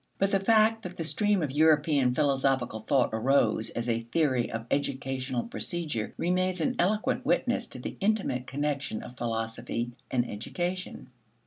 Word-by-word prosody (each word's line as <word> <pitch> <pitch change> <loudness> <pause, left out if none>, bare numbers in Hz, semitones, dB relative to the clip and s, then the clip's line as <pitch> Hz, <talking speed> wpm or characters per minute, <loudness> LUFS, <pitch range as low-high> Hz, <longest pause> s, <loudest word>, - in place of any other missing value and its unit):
But 195 0 +1
the 195 - +3
fact 220 +2 +4
that 180 -4 -8
the 165 - -2
stream 205 +2 +1
of 145 - -2
European 145 -3 +3
philosophical 135 -5 +1
thought 130 +3 +2
arose 110 -2 +2
as 120 +1 -4
a 115 -1 +1
theory 125 +1 0
of 115 0 -4
educational 130 -3 -1
procedure 150 - -4
remains 185 +1 0
an 160 - 0
eloquent 210 +4 +1
witness - - +1
to - - -10
the - - -6
intimate 195 - 0
connection 145 -4 -2
of 125 - -10
philosophy 115 0 -3 0.2
and 120 -1 +1
education. 175 - -4
140 Hz, 150 wpm, -28 LUFS, 120-175 Hz, 0.2 s, fact